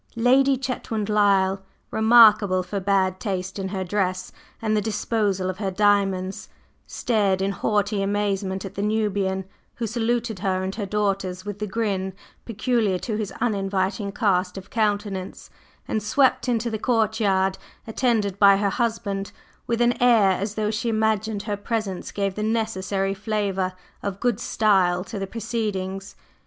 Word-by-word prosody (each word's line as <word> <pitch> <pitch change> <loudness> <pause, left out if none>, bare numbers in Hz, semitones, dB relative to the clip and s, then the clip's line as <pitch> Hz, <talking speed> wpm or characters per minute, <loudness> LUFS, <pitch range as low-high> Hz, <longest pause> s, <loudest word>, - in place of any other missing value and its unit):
Lady 265 +3 +4
Chetwynd 230 -5 -3
Lyle, 195 -2 +3 0.3
remarkable 215 -4 +6
for 195 +3 -4
bad 190 -1 +1
taste 190 -2 -3
in 190 - -2
her 190 -1 -3
dress 185 -1 -1 0.3
and 215 -1 0
the 210 - +2
disposal 205 -3 -1
of 185 0 -4
her 200 -3 -1
diamonds, 195 -1 +1 0.4
stared 205 -5 +1
in 195 +1 0
haughty 205 +1 0
amazement 195 -1 -1
at 195 - -7
the 200 - -4
Nubian, 205 -3 0 0.3
who 235 - -3
saluted 230 -1 -1
her 185 0 0
and 190 0 -3
her 205 -2 -4
daughters 195 -2 -1
with 205 -1 -6
the 210 - -2
grin 195 -3 -2 0.3
peculiar 225 -3 0
to 215 +4 -4
his 210 -2 -3
uninviting 200 -1 -1
cast 185 -3 0
of 195 0 -10
countenance, 205 -4 -2 0.4
and 215 - -1
swept 255 +4 +2
into 235 -1 0
the 220 - -3
courtyard 210 -5 +1 0.3
attended 220 -4 0
by 200 -1 +7
her 200 0 0
husband 210 -4 -2 0.4
with 235 0 0
an 240 0 +2
air 230 -6 +5
as 200 +3 -2
though 215 -1 0
she 225 +2 -2
imagined 220 -1 0
her 210 -2 -2
presence 205 -2 -3
gave 200 -1 -1
the 210 - -5
necessary 205 -3 -1
flavor 195 -2 -1 0.3
of 200 -1 -4
"good 240 -3 0
style" 190 -6 +2
to 205 +1 -6
the 195 - -3
proceedings. 205 -4 -4
205 Hz, 150 wpm, -24 LUFS, 190-220 Hz, 0.4 s, by